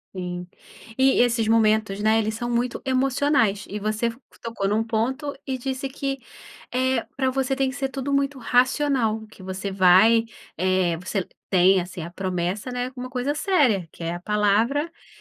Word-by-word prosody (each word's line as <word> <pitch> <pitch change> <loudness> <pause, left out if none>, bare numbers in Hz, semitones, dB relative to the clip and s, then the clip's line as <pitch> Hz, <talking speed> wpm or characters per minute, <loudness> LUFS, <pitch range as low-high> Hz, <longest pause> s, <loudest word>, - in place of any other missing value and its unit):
Sim. 180 -1 -5 0.5
E 265 0 +4
esses 235 -2 +2
momentos, 215 -2 +2
né, 220 +1 +3
eles 220 0 0
são 240 +2 -4
muito 240 +1 -1
emocionais 260 -6 +1
e 205 - -4
você 215 +3 -1
fa 230 - -10 0.2
tocou 230 -4 -3
num 215 +2 +1
ponto 255 +6 -2
e 265 -2 -2
disse 265 +1 -4
que, 275 0 -3 0.5
eh, 260 -1 +1
pra 260 -1 +1
você 270 0 0
tem 270 -1 +1
que 260 - -7
ser 275 -1 -2
tudo 270 +1 -3
muito 275 0 0
racional, 250 -3 +1
que 205 -3 -15
você 190 +1 -4
vai, 195 +5 +5 0.3
eh, 185 -1 +1
você 180 +4 -3
l 185 - -5 0.2
tem, 185 0 +5
assim, 175 0 -7
a 170 - -6
promessa, 185 +5 -3
né, 245 0 -2
como 250 -1 -7
uma 255 - -7
coisa 255 +3 -1
séria, 275 - +2
que - - -10
é 165 +1 -2
a - - -6
palavra 210 - +1
e 335 - -20
230 Hz, 185 wpm, -24 LUFS, 195-265 Hz, 0.5 s, vai